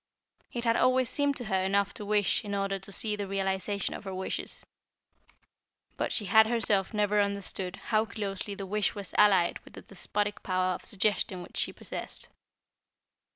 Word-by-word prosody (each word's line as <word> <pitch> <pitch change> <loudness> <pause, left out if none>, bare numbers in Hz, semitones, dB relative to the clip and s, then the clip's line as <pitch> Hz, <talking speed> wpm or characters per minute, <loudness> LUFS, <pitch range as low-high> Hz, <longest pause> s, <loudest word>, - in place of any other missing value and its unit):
It 240 - -4
had 230 -1 +3
always 255 -1 +3
seemed 285 -1 +1
to 250 - -3
her 190 -3 +1
enough 200 +1 +1
to - - -8
wish 210 +2 +2
in 205 -1 -3
order 195 0 -1
to 190 +1 -10
see 210 +1 0
the 205 -1 -4
realisation 195 0 -1
of - - -7
her 190 -1 -4
wishes. 190 - -4 1.3
But - - -2
she 210 - +1
had 220 +3 +6
herself 220 -5 +1
never 210 -1 +2
understood 200 -2 -1
how 215 +1 0
closely 200 -1 -4
the 195 - -5
wish 210 +2 0
was 200 -2 -6
allied 195 -4 +5
with - - -16
the - - -10
despotic 205 +2 -3
power 185 0 +1
of - - -7
suggestion 190 -2 0
which - - -11
she - - +1
possessed. - - -5
200 Hz, 175 wpm, -29 LUFS, 190-210 Hz, 1.3 s, had